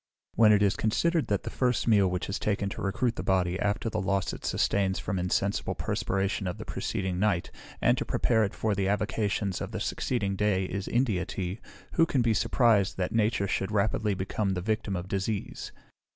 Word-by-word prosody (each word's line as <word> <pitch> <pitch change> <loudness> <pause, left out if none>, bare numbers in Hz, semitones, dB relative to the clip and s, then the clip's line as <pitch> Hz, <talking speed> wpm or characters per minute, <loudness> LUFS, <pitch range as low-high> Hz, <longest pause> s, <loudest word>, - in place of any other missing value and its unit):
When 110 -1 +6
it 105 -1 +5
is 100 - +3
considered 165 +9 +1
that 100 -2 0
the - - -5
first 125 -2 0
meal 105 -4 +5
which 90 0 -2
is 95 - -3
taken 100 -1 -1
to - - -6
recruit 115 +5 0
the - - -2
body, 95 -1 +1
after 105 +3 0
the 110 - -1
loss 95 0 0
it - - -9
sustains 95 -2 +1
from 95 - -3
the - - 0
insensible 100 +3 0
perspiration 95 0 -1
of 90 - -3
the - - -7
preceding 95 -2 -3
night, 100 -4 +1 0.3
and - - +5
to - - 0
prepare 110 -2 +2
it 100 - -2
for 110 -1 0
the 95 -1 0
avocations 105 -1 -1
of - - -3
the - - -2
succeeding 100 -6 -1
day, 95 -2 +1
is 100 +1 -4
India 115 -8 +1
tea, 95 +3 -4 0.3
who 165 -1 +4
can 130 -5 +1
be 115 -1 +3
surprised 110 -3 +2
that 90 -1 -2
nature 110 -2 +1
should 95 +2 -1
rapidly 105 0 +1
become 95 +1 -1
the - - -1
victim 110 0 -1
of 90 +1 -4
disease? 100 +2 -3
100 Hz, 205 wpm, -28 LUFS, 95-110 Hz, 0.3 s, When